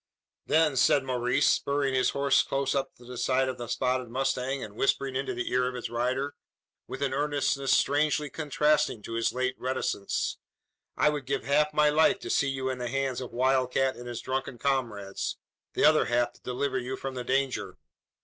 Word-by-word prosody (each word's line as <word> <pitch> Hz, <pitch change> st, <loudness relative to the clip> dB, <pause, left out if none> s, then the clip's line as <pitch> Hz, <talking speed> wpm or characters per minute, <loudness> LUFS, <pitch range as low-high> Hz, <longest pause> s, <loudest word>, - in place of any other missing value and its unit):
"Then," 155 Hz, -3 st, +3 dB
said 135 Hz, +2 st, +4 dB
Maurice, 125 Hz, -1 st, +1 dB
spurring 140 Hz, -1 st, +1 dB
his 130 Hz, -1 st, +3 dB
horse 140 Hz, -1 st, +3 dB
close 135 Hz, 0 st, -1 dB
up 135 Hz, -1 st, -2 dB
to 120 Hz, -, -17 dB
the 125 Hz, -1 st, -7 dB
side 130 Hz, 0 st, +2 dB
of 130 Hz, -1 st, -4 dB
the 120 Hz, -, -5 dB
spotted 125 Hz, 0 st, -1 dB
mustang, 135 Hz, +1 st, -1 dB
and 105 Hz, -1 st, -9 dB
whispering 135 Hz, +1 st, 0 dB
into 135 Hz, -1 st, -2 dB
the 125 Hz, -, -3 dB
ear 125 Hz, 0 st, +2 dB
of 125 Hz, -, -4 dB
its 120 Hz, -2 st, -5 dB
rider, 130 Hz, +4 st, -1 dB, 0.5 s
with 135 Hz, +2 st, -5 dB
an 135 Hz, -1 st, 0 dB
earnestness 145 Hz, -1 st, 0 dB
strangely 150 Hz, +1 st, +2 dB
contrasting 150 Hz, -5 st, +1 dB
to 115 Hz, -, -7 dB
his 115 Hz, 0 st, +1 dB
late 130 Hz, 0 st, -1 dB
reticence, 130 Hz, -6 st, -2 dB, 0.6 s
"I 150 Hz, -, +4 dB
would 145 Hz, -3 st, -4 dB
give 140 Hz, 0 st, -1 dB
half 150 Hz, +2 st, +2 dB
my 150 Hz, 0 st, +4 dB
life 175 Hz, +7 st, +4 dB
to -, -, -4 dB
see 140 Hz, -, +2 dB
you 135 Hz, -1 st, -2 dB
in 130 Hz, -1 st, -2 dB
the 125 Hz, -, -3 dB
hands 135 Hz, -1 st, -1 dB
of 125 Hz, -, -7 dB
Wild 130 Hz, 0 st, +2 dB
Cat 135 Hz, 0 st, +2 dB
and 120 Hz, 0 st, -9 dB
his 120 Hz, -1 st, -5 dB
drunken 130 Hz, -1 st, -3 dB
comrades 115 Hz, -7 st, -2 dB, 0.4 s
the -, -, +2 dB
other -, -, +5 dB
half 120 Hz, 0 st, +1 dB
to -, -, -22 dB
deliver 130 Hz, +1 st, -2 dB
you 130 Hz, +1 st, -4 dB
from 135 Hz, 0 st, -5 dB
the 125 Hz, -1 st, -4 dB
danger." 135 Hz, +1 st, -1 dB
130 Hz, 195 wpm, -28 LUFS, 125-140 Hz, 0.6 s, other